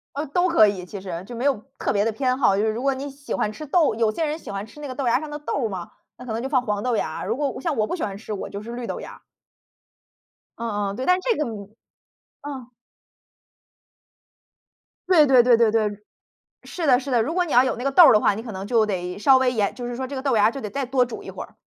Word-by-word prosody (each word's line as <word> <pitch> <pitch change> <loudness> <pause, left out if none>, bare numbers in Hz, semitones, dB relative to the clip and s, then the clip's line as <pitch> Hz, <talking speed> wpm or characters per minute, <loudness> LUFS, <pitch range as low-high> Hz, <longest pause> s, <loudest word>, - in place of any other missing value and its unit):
呃， 295 +2 -2
都 355 +6 +1
可 275 -11 +6
以， 190 -3 -2
其 195 +2 -8
实， 180 -2 -6
就 235 +3 -9
没 245 - -3
有 265 -7 +1 0.2
特 - - -1
别 205 0 +1
的 225 - +1
偏 255 +3 0
好。 200 -7 +3
就 205 - +1
是 220 - +2
如 230 +4 -4
果 275 -1 +1
你 275 +2 -5
喜 280 +1 -9
欢 210 - -1
吃 305 +6 -8
豆 305 -6 +2
有 225 -1 +1
些 320 +9 -2
人 305 +1 -2
喜 235 - -10
欢 200 +1 -5
吃 295 - -14
那 290 - -6
个 255 - -5
豆 270 -2 -3
芽 235 - +3
儿 - - -1
上 305 -1 -7
的 295 - -5
豆 280 -4 -2
儿 - - -2
嘛， 180 -4 -7 0.3
那 250 - -10
可 220 - -4
能 230 +2 -3
就 265 - -3
放 260 -3 +2
黄 210 -3 -2
豆 245 -3 0
芽 155 - -2
儿。 - - -5
如 225 - 0
果 285 -2 -2
像 330 -5 -2
我 215 -1 +1
不 - - -3
喜 350 - -5
欢 195 -2 -3
吃， 215 - -8
我 200 - -4
就 200 - -7
是 230 +3 -8
绿 240 -1 -5
豆 - - -4
芽 - - -9
儿。 - - -15 1.4
嗯 205 -3 -2
嗯。 200 - -6
对， 255 - -4
但 365 0 +4
这 465 +1 0
个 300 - 0 1.0
嗯。 265 -4 -7 2.4
对 320 -5 +6
对 255 -3 +6
对 240 -1 +5
对 230 -2 +4
对。 210 -2 0 0.7
是 335 -4 -4
的 250 -1 +5
是 275 0 -6
的。 235 -2 +3
如 310 +9 -2
果 360 -1 +1
你 315 - -6
要 250 +2 +7
有 260 - -1
那 245 - -6
个 275 - 0
豆 340 +4 +8
儿 - - +7
的 210 - +5
话， 205 - +3
你 220 - -5
可 230 -2 -8
能 190 0 -6
就 225 -1 +3
得 180 -3 -3
稍 265 +5 +6
微 260 -1 +2
延 210 -4 0
就 245 -1 -6
是 245 - -5
说 260 +1 -4
这 280 - -6
个 260 - -4
豆 265 -4 +1
芽 205 - +4
儿 225 - +4
就 275 - -7
得 210 - -5
再 275 +2 -3
多 255 0 +2
煮 240 - -8
一 - - -9
会 - - -7
儿。 - - -17
245 Hz, 315 characters per minute, -23 LUFS, 215-280 Hz, 2.4 s, 豆